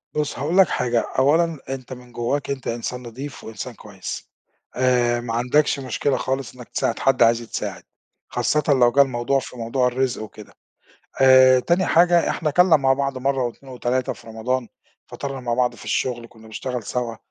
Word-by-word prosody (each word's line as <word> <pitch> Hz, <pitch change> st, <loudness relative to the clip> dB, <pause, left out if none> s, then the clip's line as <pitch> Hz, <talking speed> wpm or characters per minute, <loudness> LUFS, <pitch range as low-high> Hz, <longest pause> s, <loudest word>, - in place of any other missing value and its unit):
بُص 150 Hz, -4 st, -2 dB
هاقول 160 Hz, +7 st, -1 dB
لك 190 Hz, -, +7 dB
حاجة، 120 Hz, -1 st, +1 dB, 0.2 s
أولًا 160 Hz, +3 st, +3 dB
أنت 130 Hz, -1 st, -6 dB
من 125 Hz, -1 st, -13 dB
جواك 125 Hz, +5 st, -2 dB
أنت 135 Hz, -2 st, -4 dB
إنسان 120 Hz, +2 st, -4 dB
نضيف 130 Hz, +5 st, -8 dB
وإنسان 110 Hz, +3 st, -7 dB
كويس 100 Hz, -4 st, -8 dB, 0.5 s
آآ 125 Hz, -2 st, +2 dB
ما 115 Hz, -1 st, -4 dB
عَندكش 140 Hz, +5 st, +2 dB
مشكلة 130 Hz, +1 st, -1 dB
خالص 130 Hz, -1 st, -3 dB
إنك 125 Hz, -2 st, -12 dB
تساعد 115 Hz, -, -1 dB
حد 135 Hz, -3 st, +3 dB
عايز 115 Hz, +1 st, +4 dB
يتساعد، 115 Hz, -, -5 dB, 0.5 s
خاصةً 150 Hz, -1 st, 0 dB
لو 125 Hz, -4 st, +5 dB
جه 140 Hz, -, +5 dB
الموضوع 130 Hz, 0 st, +1 dB
في 125 Hz, -, -10 dB
موضوع 125 Hz, +2 st, 0 dB
الرزق 125 Hz, -2 st, -1 dB
وكده. 105 Hz, -1 st, -12 dB, 0.7 s
آآ 130 Hz, -1 st, +7 dB
تاني 175 Hz, +6 st, +1 dB
حاجة 170 Hz, 0 st, +4 dB
إحنا 155 Hz, -2 st, -1 dB
كَلنا 180 Hz, +1 st, +5 dB
مع 135 Hz, -2 st, +2 dB
بعض 135 Hz, -1 st, -1 dB
مرة 135 Hz, -1 st, 0 dB
و2 130 Hz, +2 st, -7 dB
و3 125 Hz, +1 st, -1 dB
في -, -, -15 dB
رمضان، 115 Hz, +2 st, -2 dB, 0.4 s
فطرنا 135 Hz, -2 st, -6 dB
مع 120 Hz, -1 st, -1 dB
بعض 125 Hz, 0 st, +1 dB
في -, -, -13 dB
الشغل 120 Hz, -2 st, -2 dB
كنا 110 Hz, -1 st, -17 dB
بنشتغل 125 Hz, +2 st, -5 dB
سَوا، 115 Hz, +1 st, -3 dB
130 Hz, 175 wpm, -22 LUFS, 120-140 Hz, 0.7 s, لك